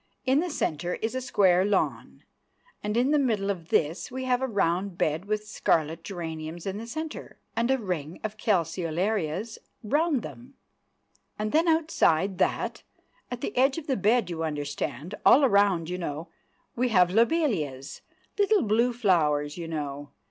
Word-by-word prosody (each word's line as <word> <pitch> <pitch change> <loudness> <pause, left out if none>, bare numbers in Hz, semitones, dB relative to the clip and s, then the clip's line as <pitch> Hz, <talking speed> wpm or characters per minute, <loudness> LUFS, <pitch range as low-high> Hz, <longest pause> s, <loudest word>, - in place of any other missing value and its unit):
In 265 +2 +3
the 355 +2 -1
centre 175 - -2
is 225 +2 -3
a 260 - -2
square 190 -7 +3
lawn, 200 -1 -1 0.6
and 210 +2 -1
in 255 +4 +3
the 300 - +4
middle 215 -7 +1
of 170 -4 -7
this 160 +4 0
we 260 0 -5
have 255 0 +1
a 265 - 0
round 195 -3 0
bed 155 +4 0
with 210 0 -2
scarlet 165 -6 0
geraniums 165 -3 -6
in 195 +1 -3
the 230 - -7
centre, 315 +5 -6 0.2
and 235 +1 +1
a 265 - +3
ring 180 - -4
of 215 -1 -3
calceolarias 185 +1 -1 0.2
round 290 +3 +1
them, 255 +3 -10 0.8
and 215 0 -2
then 325 +3 +3
outside 200 - +2
that, - - 0 0.5
at 245 -1 -5
the - - -4
edge 265 +3 +3
of 325 - -5
the 270 - 0
bed, 215 +1 +2
you 165 -1 -3
understand, 145 - -4
all 275 +1 +7
round, 200 -6 +3
you 180 +1 -4
know, 165 0 -5 0.5
we 250 +1 +1
have 180 -5 +4
lobelias, 205 - 0 0.4
little 405 -1 +4
blue 230 +4 +2
flowers, 150 -10 +1
you 170 -2 -6
know. 145 -3 -5
200 Hz, 165 wpm, -27 LUFS, 165-245 Hz, 0.8 s, all